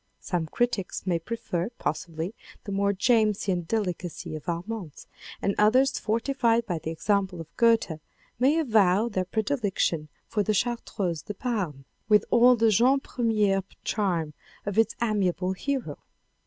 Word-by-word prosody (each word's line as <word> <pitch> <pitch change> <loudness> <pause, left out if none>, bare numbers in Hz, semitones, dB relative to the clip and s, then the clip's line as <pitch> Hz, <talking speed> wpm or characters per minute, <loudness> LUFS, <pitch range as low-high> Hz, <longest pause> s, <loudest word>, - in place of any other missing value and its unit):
Some 175 -4 -2
critics 240 -1 -1
may 175 -3 +1
prefer, 180 -1 -3
possibly, 165 +4 -3 0.3
the 200 - -6
more 200 0 +2
Jamesian 200 -5 +1
delicacy 180 -7 -3
of 155 - -6
Armance, 175 -1 -5 0.4
and 200 - +2
others 255 +6 +4
fortified 230 +1 +1
by 175 -6 -2
the 160 - -5
example 190 +2 0
of 165 - -10
Goethe 230 -9 +3 0.4
may 275 +5 +4
avow 220 - +3
their 185 -4 -1
predilection 205 - -1 0.2
for 210 - -1
The 210 +1 +1
Chartreuse 195 -8 -1
de 210 - -7
Parme 190 - -3 0.2
with 210 -1 +5
all 245 +1 +7
the 225 -1 +3
jeune 250 +7 +4
premier 210 -7 +1 0.2
charm 175 -8 -1 0.3
of 205 +1 0
its 225 - +2
amiable 190 -4 0
hero. 270 +6 -3
205 Hz, 140 wpm, -27 LUFS, 180-230 Hz, 0.4 s, all